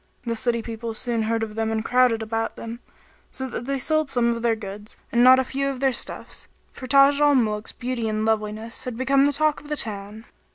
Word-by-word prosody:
The 230 -1 -1
city 235 0 0
people 225 0 -6
soon 235 -1 -1
heard 225 +1 0
of 215 -1 -5
them 220 0 -1
and 220 0 -2
crowded 245 -3 +3
about 225 +1 -3
them, 230 +1 -7 0.5
so 265 - -4
that 240 -1 -6
they 275 +1 -1
sold 310 +2 0
some 245 -3 +2
of 230 - -6
their 230 -1 +2
goods 205 0 -9
and 240 +1 +3
not 255 +1 +8
a 260 - +2
few 275 +2 -2
of 270 -2 -5
their 270 -1 +2
stuffs; - - -6 0.2
for 255 - -9
Taj 275 +2 +5
al 290 -1 +5
Muluk's 215 -3 0
beauty 245 -2 -3
and 215 0 -1
loveliness 220 +1 -2
had 250 -3 -5
become 275 +2 +3
the - - +2
talk 305 +1 +1
of 295 - -14
the 300 - -2
town. 210 0 -2
235 Hz, 230 wpm, -23 LUFS, 220-265 Hz, 0.5 s, not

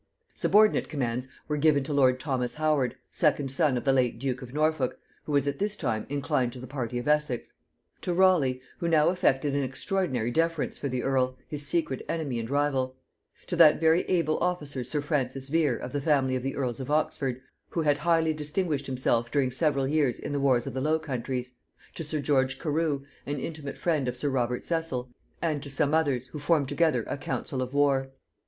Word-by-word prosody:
] - - -47
Subordinate 215 +1 +3
commands 125 -3 -2 0.2
were 150 - -1
given 145 -2 +3
to 145 +2 -3
lord 130 -2 +4
Thomas 130 -3 -2
Howard, 150 -5 +1 0.2
second 145 -4 +1
son 140 -2 +2
of 120 - -3
the 135 - +3
late 125 -3 +2
duke 130 +1 -2
of 125 -1 -9
Norfolk, 155 -2 0 0.3
who - - -5
was 140 -1 +2
at 140 0 -2
this 205 +1 0
time 110 - -2
inclined 130 -3 0
to 125 - -8
the 125 - -7
party 125 -3 -4
of 120 - -4
Essex; 150 -5 0 0.5
to 180 - -2
Raleigh, 170 -9 +3 0.2
who 170 - -1
now 155 -2 +4
affected 150 -6 +1
an 140 - +1
extraordinary 135 - -1
deference 165 +2 0
for 140 - -4
the 125 -1 -2
earl, 130 -1 +1
his 145 -1 -5
secret 135 -4 -1
enemy 145 -8 -2
and 115 0 -5
rival; 135 -2 0 0.5
to - - -3
that 155 -3 +7
very 160 +2 +4
able 165 -4 +1
officer 150 -7 -1
sir 135 +5 -2
Francis 135 -3 -2
Vere 150 -5 +2
of 125 - -6
the 145 - -1
family 135 -3 +2
of 130 - -1
the 135 +2 -3
earls 125 -3 -2
of 130 - -5
Oxford, 135 -4 0 0.3
who 165 - -1
had 145 -1 +3
highly 165 0 +2
distinguished 150 -1 -2
himself 120 -3 0
during 135 -3 +1
several 140 -1 +1
years 145 -4 +1
in - - -6
the 145 - 0
wars 130 -3 +3
of - - -5
the 130 - -2
Low 155 +3 +2
Countries; 130 -4 -4 0.4
to 165 - -5
sir 155 0 -3
George 135 -3 +1
Carew, 155 -3 -1 0.2
an 145 +1 -2
intimate 155 -1 -6
friend 155 -6 0
of 125 0 -3
sir 145 +3 -1
Robert 125 -2 -1
Cecil; 150 -7 -2 0.3
and 155 -4 0
to 140 - -7
some 140 +2 +1
others, 140 -6 +2
who 150 - -7
formed 145 -2 +2
together 165 -2 +2
a - - -4
council 140 -1 -3
of 130 +2 -4
war. 140 -2 +2
140 Hz, 205 wpm, -28 LUFS, 130-155 Hz, 0.5 s, that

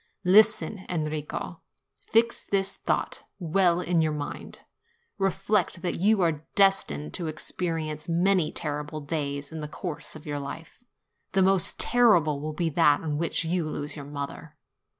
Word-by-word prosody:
Listen, 215 +1 +4
Enrico. 155 -3 -4 0.3
Fix 230 +1 +1
this 195 -1 0
thought - - -1 0.2
well 175 0 +2
in 175 -2 +1
your 155 -1 +1
mind. 145 -1 -6 0.6
Reflect 195 -2 0
that 180 - 0
you 205 +2 +3
are 160 -3 0
destined 80 - +2
to 170 - -3
experience 155 0 -3
many 175 -1 +2
terrible 150 0 -4
days 140 -1 -3
in 160 - -6
the 150 - -4
course 155 +1 -5
of 155 - -11
your 145 -1 -3
life: 160 +10 -8 0.5
the 190 0 +4
most 190 -2 +3
terrible 175 -12 +4
will 155 +1 -4
be 165 +1 -1
that 150 -2 +4
on 150 -2 -2
which 170 0 0
you 165 -1 -1
lose 145 -1 -4
your 145 -2 -8
mother. 145 +2 -7
165 Hz, 150 wpm, -27 LUFS, 150-190 Hz, 0.6 s, Listen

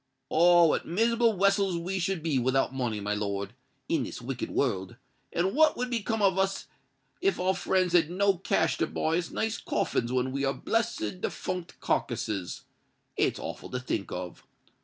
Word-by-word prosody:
"Ah! 175 +1 +6
what 160 - +1
miserable 230 +5 +2
wessels 195 -1 +2
we 185 +3 -2
should 180 -2 -1
be 150 -5 +1
without 130 +2 +1
money, 120 -5 -2
my 105 +1 -2
lord—in 100 -1 -3
this - - -5
wicked 125 +1 -4
world;—and 130 - -2
what 310 +2 +4
would 250 0 -2
become 225 -2 -1
of 190 -1 +3
us 195 0 0 0.6
if 390 +2 +1
our 185 +1 +2
friends 185 -2 +1
had 165 -3 +4
no 195 0 +2
cash 195 +1 +1
to 165 - +2
buy 160 +2 0
us 175 - -4
nice 220 0 -2
coffins 120 0 -1
when 130 0 0
we 140 +1 -2
are 135 0 +1
blessed 230 -5 -1
defunct 180 -2 -4
carkisses? 95 -4 -2 0.5
It's - - +1
awful - - -6
to 125 - -3
think 110 -5 -3
of! 90 -1 -6
175 Hz, 165 wpm, -28 LUFS, 130-195 Hz, 0.6 s, Ah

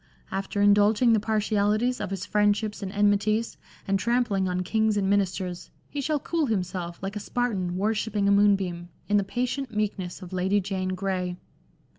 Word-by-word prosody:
After 195 +1 -1
in 205 0 +7
dulging 210 +3 +4
the 220 - +4
partialities 215 +2 +1
of 205 - -3
his 195 -1 -4
friendships 210 +1 +1
and 195 -1 -4
enmities, 205 +2 +1 0.3
and 195 0 +1
trampling 210 -4 +1
on 180 0 -1
kings 220 +2 +1
and 195 -1 +1
ministers, 185 -3 -1 0.2
he 290 - -3
shall 305 +1 0
cool 320 +1 -1
himself, 180 -5 -2
like 195 +2 -4
a - - -2
Spartan 200 -6 -2
worshipping 210 0 0
a - - +4
moonbeam, 195 -4 +2 0.2
in 205 - +3
the 200 - +2
patient 245 +4 -3
meekness 195 -3 -2
of 180 +1 -10
Lady 190 +3 +2
Jane 185 -1 -2
Grey." 185 -2 -2
205 Hz, 170 wpm, -26 LUFS, 190-215 Hz, 0.3 s, in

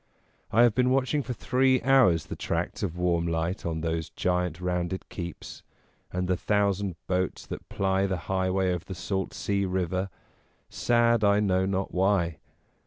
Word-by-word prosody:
I 115 +3 +5
have 120 -3 +5
been 125 +3 +2
watching 135 +2 +2
for 130 -2 -4
three 130 +2 +2
hours 125 - +4
the - - -6
tracts - - -3
of 90 -4 -3
warm 85 -1 +1
light 85 +2 -2
on 80 -1 -2
those 80 -1 -2
giant 90 -2 -1
rounded 90 0 -2
keeps, 85 -2 -7 0.5
and 90 0 -2
the 90 - +2
thousand 100 -1 0
boats 90 -1 -1
that - - -8
ply 95 0 +1
the 95 -1 -1
highway 95 0 +1
of 90 -2 -4
the 95 - -6
salt 95 +2 -2
sea 100 -1 -1
river, 95 0 -1 0.6
sad 120 -1 +2
I 100 0 +4
know 95 -2 +2
not 95 0 -2
why. 90 -4 +1
95 Hz, 165 wpm, -27 LUFS, 90-105 Hz, 0.6 s, I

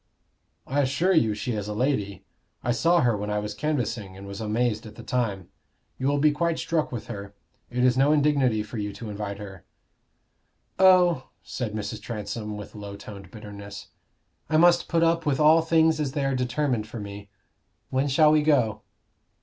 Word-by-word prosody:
"I 145 +2 0
assure 145 +8 +1
you 110 - +3
she 125 +4 -3
is 105 -3 -3
a 105 - -4
lady; 105 -6 -1 0.4
I 120 - +1
saw 170 +8 +3
her 120 -4 +2
when 105 0 -4
I 105 - 0
was 105 0 -3
canvassing, 115 -10 -3
and 100 - -10
was 100 +2 -7
amazed 110 0 -1
at 110 - -12
the - - -10
time. 105 -8 -2 0.5
You 130 - 0
will 145 +1 +2
be 150 +1 +4
quite 165 +2 0
struck 160 -2 -1
with 120 -3 -5
her. 100 0 -8 0.3
It 125 0 -1
is 125 -1 +4
no 140 +2 +4
indignity 140 -7 +2
for 110 +1 -7
you 105 -1 -3
to 110 -1 -7
invite 100 -1 -5
her." 95 -3 -10 1.2
"Oh," 180 -7 +5
said 110 -4 -4
Mrs. 110 0 -4
Transome, 105 -1 -5
with 105 - -9
low 100 -1 -8
toned 100 -2 -10
bitterness, 100 -2 -10 0.6
"I 155 - +3
must 175 +1 +5
put 165 -1 +2
up 165 -1 +2
with 140 -1 +1
all 155 +2 +6
things 160 -1 +3
as 140 -3 -2
they 145 -2 -1
are 135 - +1
determined 125 -2 -1
for 115 - -7
me. 100 0 -8 0.6
When 130 +2 +1
shall 150 +3 +5
we 155 0 +4
go?" 135 -8 +2
120 Hz, 190 wpm, -26 LUFS, 105-150 Hz, 1.2 s, all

